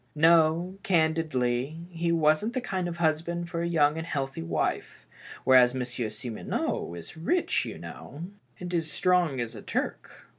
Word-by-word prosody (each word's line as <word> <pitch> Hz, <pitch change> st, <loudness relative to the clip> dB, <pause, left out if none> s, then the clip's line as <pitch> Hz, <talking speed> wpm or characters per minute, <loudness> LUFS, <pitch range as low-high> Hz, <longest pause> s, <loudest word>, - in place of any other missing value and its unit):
No, 165 Hz, +3 st, +4 dB
candidly, 160 Hz, -5 st, +1 dB
he 170 Hz, 0 st, -1 dB
wasn't 160 Hz, +7 st, +2 dB
the 255 Hz, -, 0 dB
kind 190 Hz, -7 st, -2 dB
of 170 Hz, -1 st, -5 dB
husband 170 Hz, +1 st, 0 dB
for 170 Hz, -, -2 dB
a 170 Hz, -, 0 dB
young 155 Hz, -2 st, +3 dB
and 165 Hz, -, -5 dB
healthy 135 Hz, -, -3 dB
wife, 80 Hz, -1 st, -2 dB, 0.4 s
whereas 130 Hz, -1 st, +6 dB
Monsieur 120 Hz, -3 st, -3 dB
Simoneau 110 Hz, -5 st, -3 dB
is 85 Hz, -1 st, -9 dB
rich, 185 Hz, -, +1 dB
you -, -, -6 dB
know, 155 Hz, -, -9 dB, 0.4 s
and 180 Hz, 0 st, -6 dB
as 165 Hz, -3 st, 0 dB
strong 175 Hz, -4 st, +2 dB
as 120 Hz, -2 st, -3 dB
a -, -, -8 dB
Turk." -, -, -4 dB
160 Hz, 155 wpm, -28 LUFS, 130-170 Hz, 0.4 s, whereas